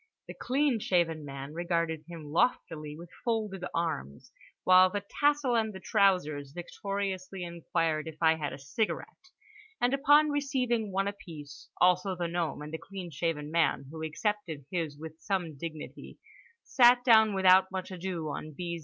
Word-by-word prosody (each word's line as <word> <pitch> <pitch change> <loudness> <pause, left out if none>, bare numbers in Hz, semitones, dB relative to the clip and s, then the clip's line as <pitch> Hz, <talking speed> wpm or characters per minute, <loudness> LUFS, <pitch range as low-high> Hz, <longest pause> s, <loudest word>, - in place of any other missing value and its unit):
The - - -7
clean 270 -2 +1
shaven 170 -5 +1
man 140 0 -7
regarded 170 -2 -1
him 170 -2 -9
loftily 155 -3 -1
with 170 +1 -11
folded 215 -6 -2
arms, 115 - -3 0.3
while 185 0 +7
the 200 +1 -4
tassel 290 -4 +3
and 220 -2 +1
the 190 - -8
trousers 180 -11 +1
victoriously 190 +1 -4
inquired 165 -2 -1
if 160 -1 -8
I 160 -1 +5
had 155 -2 -3
a - - -7
cigarette?—and 255 - -4
upon 295 +2 +5
receiving 255 -7 0
one 195 +1 0
apiece 150 - -9
(also 180 +1 +3
the 175 -1 -2
gnome, 170 -3 -2
and 150 +1 -9
the 160 - -3
clean 190 -3 -8
shaven 150 0 -2
man, 165 -4 +1
who 160 0 -7
accepted 160 -3 -3
his 165 -5 -2
with 160 +1 -10
some 180 -6 -2
dignity) 155 +1 -8 0.5
sat 245 -1 +5
down 220 -4 +6
without 190 0 +6
much 190 0 -5
ado 180 -3 -4
on 155 +1 -6
B. 170 +2 -4
180 Hz, 155 wpm, -30 LUFS, 160-210 Hz, 0.5 s, while